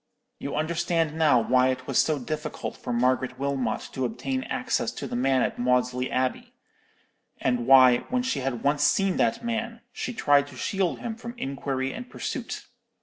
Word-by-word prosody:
You 140 - -4
understand 165 0 0
now 155 -6 +4
why 125 +2 +3
it 130 0 -2
was - - +1
so 155 -2 +2
difficult 155 +3 -5
for - - -6
Margaret 130 +1 +1
Wilmot 135 -4 -1
to 130 - -2
obtain 130 +2 -2
access - - -1
to - - -6
the - - -4
man 130 +1 +2
at - - -2
Maudesley 125 +1 +1
Abbey; 130 0 -2 0.9
and 125 -2 0
why, 130 -2 +8
when 250 0 0
she 250 - -1
had 130 -3 -3
once 145 +1 +2
seen 195 +5 +2
that 230 +1 +1
man, 230 0 -3
she - - -4
tried 145 -10 +3
to - - -12
shield 195 -3 -1
him 235 - -3
from 235 +1 -8
inquiry 135 - -3
and 245 0 -8
pursuit. - - -5
135 Hz, 175 wpm, -26 LUFS, 130-165 Hz, 0.9 s, why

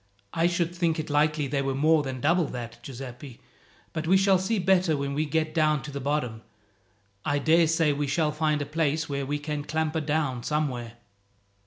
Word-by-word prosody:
"I 165 +1 +3
should 175 -1 0
think 170 -2 0
it 155 -1 -4
likely 150 0 +2
they 140 0 -1
were 135 -1 -1
more 155 +3 +4
than 130 -3 -5
double 170 +4 +3
that, 120 -3 -7
Giuseppi; 130 -1 -9 0.5
but 160 0 -3
we 190 +3 +5
shall 195 -1 +4
see 215 +4 0
better 180 -4 +3
when 140 0 -2
we 150 +2 0
get 155 0 0
down 155 -3 +2
to 145 - -7
the 140 - -4
bottom. 130 -5 -2 0.8
I 145 - +1
daresay 160 +1 +3
we 145 0 -2
shall 150 +2 +1
find 150 -1 0
a - - -6
place 155 +1 0
where 140 -1 -3
we 145 +1 -1
can 145 0 -4
clamber 160 +1 -1
down 150 -4 -1
somewhere." 125 -6 -2
150 Hz, 190 wpm, -27 LUFS, 140-160 Hz, 0.8 s, we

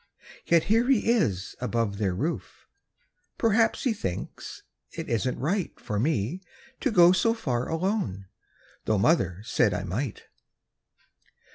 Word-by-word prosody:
Yet 170 -1 +4
here 225 +3 +2
he 230 -3 +3
is 100 - 0
above 115 -5 -1
their 95 -4 0
roof; 155 - -4 0.7
Perhaps 225 0 +2
he 250 - +2
thinks 95 - -6 0.3
it - - -6
isn't 120 +2 -1
right 180 +7 -2
For 105 -1 -3
me 145 - 0 0.4
to - - 0
go 175 -5 +7
so 225 +5 +2
far 125 - -2
alone, 165 - -1 0.6
Tho' 110 - +2
mother 95 - +2
said 110 -4 +1
I 90 - -3
might. 105 +7 -4
135 Hz, 130 wpm, -27 LUFS, -, 0.7 s, go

